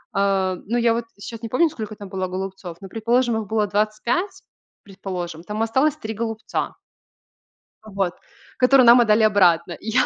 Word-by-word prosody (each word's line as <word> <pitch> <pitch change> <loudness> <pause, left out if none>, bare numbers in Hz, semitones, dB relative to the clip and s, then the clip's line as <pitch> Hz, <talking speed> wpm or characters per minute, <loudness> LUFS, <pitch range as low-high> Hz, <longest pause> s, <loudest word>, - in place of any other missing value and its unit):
Э, 195 -1 +1
ну 235 +4 -1
я 235 -1 +3
вот, 230 0 -2 0.2
щас 230 +1 -8
не 230 - -4
помню, 325 +7 +3
сколько 220 -8 -7
там 205 -1 -10
было 185 -1 -3
голубцов, 185 -2 -6
но, 195 - -8
предположим, 235 +2 +1
их 215 - -6
было 215 0 0
25, 215 - -1 0.4
предположим, 180 -4 -6
там 210 +4 -4
осталось 265 +7 +2
3 220 -6 -5
голубца 225 0 -4 1.1
вот, 195 -4 -2 0.4
которые 255 0 +5
нам 240 +1 +8
отдали 220 -1 +4
обратно. 185 -6 +4
И 220 - -8
я, 250 +4 +3
215 Hz, 165 wpm, -22 LUFS, 195-235 Hz, 1.1 s, нам